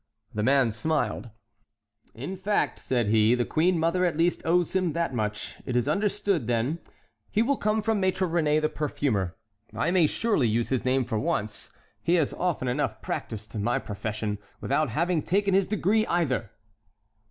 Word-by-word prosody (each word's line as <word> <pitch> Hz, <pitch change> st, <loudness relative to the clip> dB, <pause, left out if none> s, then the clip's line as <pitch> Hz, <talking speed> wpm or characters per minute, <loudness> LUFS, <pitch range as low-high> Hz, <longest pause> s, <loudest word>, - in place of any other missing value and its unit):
The 105 Hz, -, -2 dB
man 130 Hz, 0 st, +3 dB
smiled. 125 Hz, +2 st, -1 dB, 0.9 s
"In 140 Hz, -, -5 dB
fact," 200 Hz, +3 st, 0 dB
said 120 Hz, -5 st, 0 dB
he, 110 Hz, +2 st, +4 dB
"the 120 Hz, -1 st, 0 dB
queen 175 Hz, +3 st, +2 dB
mother 170 Hz, +3 st, +1 dB
at 170 Hz, -4 st, +1 dB
least 170 Hz, +1 st, +2 dB
owes 175 Hz, +2 st, +2 dB
him 185 Hz, -4 st, +1 dB
that 170 Hz, -4 st, -1 dB
much. 105 Hz, -3 st, -3 dB
It 125 Hz, -, -4 dB
is 120 Hz, -1 st, +2 dB
understood, 200 Hz, -, 0 dB
then; 120 Hz, +7 st, 0 dB, 0.5 s
he 220 Hz, -, +2 dB
will 280 Hz, +4 st, +2 dB
come 215 Hz, -2 st, 0 dB
from 220 Hz, -2 st, +1 dB
Maître 190 Hz, 0 st, +1 dB
Réné, 155 Hz, -3 st, +2 dB
the 155 Hz, -, +1 dB
perfumer. 120 Hz, -, -1 dB, 0.4 s
I -, -, +1 dB
may 175 Hz, -4 st, +4 dB
surely 205 Hz, -, +1 dB
use 115 Hz, +2 st, 0 dB
his 130 Hz, -2 st, 0 dB
name 130 Hz, 0 st, +2 dB
for 115 Hz, -3 st, -1 dB
once: 105 Hz, -1 st, -2 dB, 0.2 s
he 170 Hz, -, +2 dB
has 160 Hz, -5 st, +1 dB
often 175 Hz, -8 st, -1 dB
enough 125 Hz, -3 st, -1 dB
practised 110 Hz, -1 st, -5 dB
my 115 Hz, +4 st, 0 dB
profession 105 Hz, -2 st, -4 dB, 0.2 s
without 150 Hz, +1 st, 0 dB
having 170 Hz, +6 st, +1 dB
taken 195 Hz, +4 st, +1 dB
his 190 Hz, -1 st, +3 dB
degree 215 Hz, +2 st, +1 dB
either." 135 Hz, -, 0 dB
150 Hz, 170 wpm, -27 LUFS, 115-180 Hz, 0.9 s, he